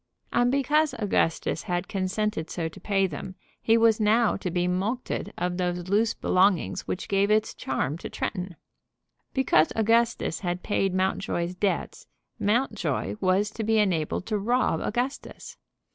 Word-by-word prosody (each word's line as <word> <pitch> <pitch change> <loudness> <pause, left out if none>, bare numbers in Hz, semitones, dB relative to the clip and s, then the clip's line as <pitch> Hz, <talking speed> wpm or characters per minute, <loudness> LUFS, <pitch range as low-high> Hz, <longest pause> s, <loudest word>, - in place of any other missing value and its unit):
And 245 0 +3
because 290 +3 +2
Augustus 180 -7 0
had 175 -1 -2
consented 195 -3 -2
so 165 -2 -2
to 160 - -11
pay 195 -2 +1
them 185 +2 -6 0.3
he 225 0 +4
was 225 -1 +4
now 220 +1 +3
to 190 - -3
be 175 +1 0
mulcted 200 +8 -2
of 180 0 -1
those 180 -1 -2
loose 220 +3 +2
belongings 185 - +1
which 185 - -3
gave 200 0 +2
its 215 +1 +2
charm 135 +4 -2
to - - -6
Tretton! 180 -2 -4 0.8
Because 235 - +3
Augustus 225 -5 +2
had 175 -1 -3
paid 195 -2 0
Mountjoy's 185 -2 -1
debts 195 +2 -2 0.3
Mountjoy 215 +1 0
was 195 +2 +2
to 220 - -4
be 220 +1 +2
enabled 180 -4 0
to 215 -2 -1
rob 235 -5 +1
Augustus! 250 +5 -4
195 Hz, 145 wpm, -26 LUFS, 180-225 Hz, 0.8 s, he